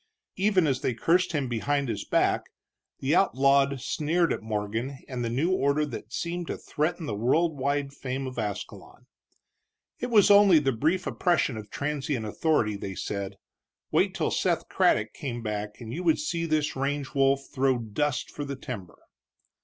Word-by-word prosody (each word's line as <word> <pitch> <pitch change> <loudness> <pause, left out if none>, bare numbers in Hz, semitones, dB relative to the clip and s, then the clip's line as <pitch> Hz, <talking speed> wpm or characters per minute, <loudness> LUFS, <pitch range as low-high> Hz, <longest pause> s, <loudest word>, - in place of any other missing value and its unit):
Even 190 -2 +3
as 135 -3 0
they 125 - 0
cursed 175 +6 +2
him 145 -4 0
behind 140 +4 0
his 105 -4 -3
back, - - +1 0.6
the 135 +3 +1
outlawed 140 -5 +3
sneered 160 +6 +1
at - - -4
Morgan 110 +5 -3
and 125 -2 -4
the 115 - -1
new 140 +10 +1
order 145 -3 +2
that 150 - -8
seemed 175 0 -3
to - - -3
threaten 160 +2 -2
the 145 - -3
world 150 +10 +2
wide 140 +1 -1
fame 135 0 -4
of 130 -2 -5
Ascalon. 105 -2 -6 0.9
It 245 - -3
was 210 -3 +6
only 200 -4 +7
the 140 -3 +2
brief 160 +10 0
oppression 170 -8 +1
of 105 -1 -8
transient 145 -4 -2
authority, 110 -2 +1
they 95 -1 -6
said; 100 +1 -4 0.6
wait - - +2
till - - 0
Seth - - 0
Craddock 105 0 +2
came 120 -4 -5
back 105 -1 -4
and 115 -1 -7
you 170 - -3
would 165 -3 +3
see 170 - -2
this 155 -1 0
range 140 0 -2
wolf 135 -1 +3
throw 130 -2 +2
dust 125 +5 -2
for 145 - -5
the 140 -1 -4
timber. 115 -9 -8
140 Hz, 170 wpm, -27 LUFS, 120-160 Hz, 0.9 s, only